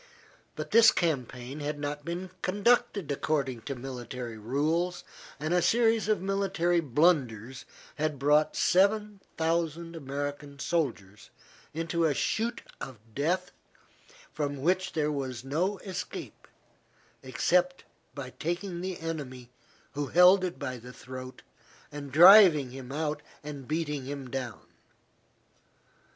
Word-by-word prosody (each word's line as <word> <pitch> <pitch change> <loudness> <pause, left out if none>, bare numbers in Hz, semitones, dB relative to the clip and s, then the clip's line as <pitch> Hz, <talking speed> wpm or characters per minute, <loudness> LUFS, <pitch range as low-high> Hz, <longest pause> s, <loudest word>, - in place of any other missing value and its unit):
But - - -6
this 230 0 +8
campaign 135 -4 -2
had 145 0 -3
not 145 0 -4
been 175 +3 -5
conducted 205 -3 +1
according 140 -4 -1
to 140 - -2
military 125 -2 -6
rules, 160 +10 -1 0.4
and 155 +4 -1
a 180 - +3
series 225 -1 +3
of 210 -4 +1
military 190 -3 +1
blunders 130 - +1 0.3
had 155 -1 -1
brought 150 +3 +3
seven 205 +2 +2 0.2
thousand 165 0 -1
American 145 0 -5
soldiers 120 - -2 0.4
into 165 +1 -1
a 150 -3 +2
chute 230 - -1 0.2
of 130 -3 -7 0.2
death 180 - -1 0.8
from 145 -2 -3
which 185 +3 +1
there 150 -1 0
was 130 -4 -4
no 170 +9 -1
escape 190 -2 -7 0.7
except 270 0 +1 0.3
by - - -6
taking 175 +2 -3
the 185 -1 -4
enemy 135 -7 -6 0.4
who 145 0 -3
held 180 +5 +6
it 180 -1 -3
by 130 0 -4
the 125 +2 -11
throat 130 0 -9 0.5
and 145 -2 -7
driving 165 - +8
him 130 0 -9
out 150 0 -2 0.2
and 145 -3 -8
beating 150 -4 -2
him 135 -2 -6
down. 125 -4 -5
155 Hz, 120 wpm, -29 LUFS, 135-180 Hz, 0.8 s, this